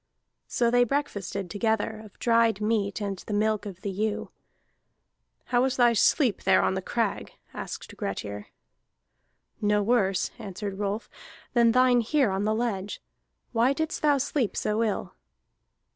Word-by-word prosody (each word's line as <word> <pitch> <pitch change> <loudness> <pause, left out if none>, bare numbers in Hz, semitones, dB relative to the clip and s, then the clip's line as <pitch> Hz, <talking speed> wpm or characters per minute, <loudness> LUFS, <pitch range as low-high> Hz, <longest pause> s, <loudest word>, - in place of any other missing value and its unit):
So 235 -1 +1
they 245 0 +5
breakfasted 205 -8 -2
together, 220 0 -1
of 210 - -15
dried 230 -3 +3
meat 210 -1 0
and 200 -2 -3
the 210 - -4
milk 215 0 +1
of 185 -2 -9
the 200 - -3
ewe. 210 +2 -2 1.1
"How 245 -1 +2
was 260 0 +1
thy 240 -1 +5
sleep 230 - +3
there 190 0 +4
on - - +2
the 190 - -2
crag?" 225 +1 -2 0.2
asked - - -7
Grettir. 100 +1 -5 1.1
"No 210 0 +2
worse," 200 -4 +1
answered 200 -1 -6
Rolf, 205 +2 -2 0.5
"than 235 -1 +5
thine 250 0 +4
here 260 -1 +2
on 195 +2 -1
the 215 0 +1
ledge. 210 -4 -2 0.5
Why 240 +3 +3
didst 315 +3 -3
thou 295 -2 +4
sleep 265 -4 -1
so 215 +1 0
ill?" 205 -4 -2
215 Hz, 145 wpm, -27 LUFS, 200-240 Hz, 1.1 s, they